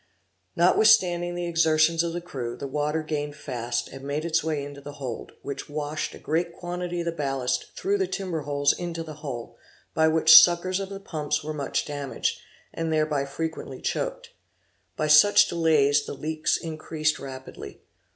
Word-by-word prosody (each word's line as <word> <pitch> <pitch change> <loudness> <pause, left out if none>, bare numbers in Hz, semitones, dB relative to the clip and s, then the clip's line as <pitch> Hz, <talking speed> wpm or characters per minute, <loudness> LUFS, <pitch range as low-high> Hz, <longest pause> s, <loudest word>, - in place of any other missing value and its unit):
Notwithstanding 175 -1 +4
the 175 0 -3
exertions 165 -1 +3
of 170 0 -1
the 175 - -4
crew, 130 -9 -6
the - - -6
water 150 +3 -1
gained 150 -1 -3
fast, 120 -4 -3
and 135 0 -10
made 145 +3 -3
its 165 -2 +1
way 155 -3 -2
into 140 0 -10
the 145 +1 -9
hold, 130 -5 -6
which 140 - -6
washed 150 +1 -3
a - - -10
great 170 +2 -1
quantity 175 0 -4
of - - -5
the 170 - 0
ballast 135 -5 -2
through 400 +1 0
the 385 - +1
timber 185 - -3
holes 145 0 +1
into 170 -2 -5
the 155 -2 -9
hull, 125 -6 -6 0.4
by 160 0 +3
which 160 0 +4
the - - +14
suckers 180 +2 +1
of 195 -1 -5
the 195 0 -7
pumps 150 -6 -3
were 155 +1 -4
much 145 -2 -2
damaged, 145 -2 -3 0.3
and 165 -1 -2
thereby 155 -3 +1
frequently 160 +4 -5
choaked. - - -3 0.7
By 155 - 0
such 155 +7 +7
delays 150 -4 +2
the - - -5
leaks 155 +2 -1
increased 155 -1 -2
rapidly. 130 -1 -9
155 Hz, 175 wpm, -26 LUFS, 145-170 Hz, 0.7 s, the